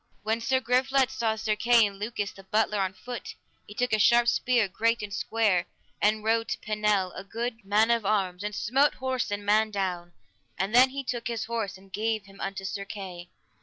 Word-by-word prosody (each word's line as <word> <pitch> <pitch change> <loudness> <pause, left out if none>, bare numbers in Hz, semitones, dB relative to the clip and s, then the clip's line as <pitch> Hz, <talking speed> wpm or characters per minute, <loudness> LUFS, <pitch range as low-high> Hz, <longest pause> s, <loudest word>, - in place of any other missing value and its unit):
When 220 +2 0
Sir 260 +2 +2
Griflet 260 +1 +2
saw 225 -3 0
Sir 220 -1 -1
Kay 230 +1 +5
and 200 -1 -5
Lucas 210 -1 -3
the 195 - -14
butler 210 +1 +1
on 190 -1 -1
foot, 245 +5 -7 0.3
he 205 - -11
took 245 0 0
a 215 - +3
sharp 235 +3 +5
spear, 240 -5 +2
great 230 +4 0
and 205 -1 -6
square, 200 -4 +1 0.3
and 215 +1 +2
rode 225 +1 +1
to - - -1
Pinel, 210 -3 0
a 190 - -6
good 230 +2 -4
man 210 +3 +3
of 235 -2 +2
arms, 195 -2 0
and 210 0 -3
smote 270 +8 +2
horse 260 -1 -2
and 205 0 -4
man 215 +1 +3
down, 180 -4 -3 0.4
and 190 +5 -2
then 255 +2 +7
he 275 +1 -5
took 240 -2 -3
his 230 -2 -3
horse, 220 -4 -3
and 190 0 -20
gave 220 -1 -1
him 195 0 -14
unto 195 0 -4
Sir 200 +1 -3
Kay. 185 -3 -8
215 Hz, 205 wpm, -27 LUFS, 195-235 Hz, 0.4 s, then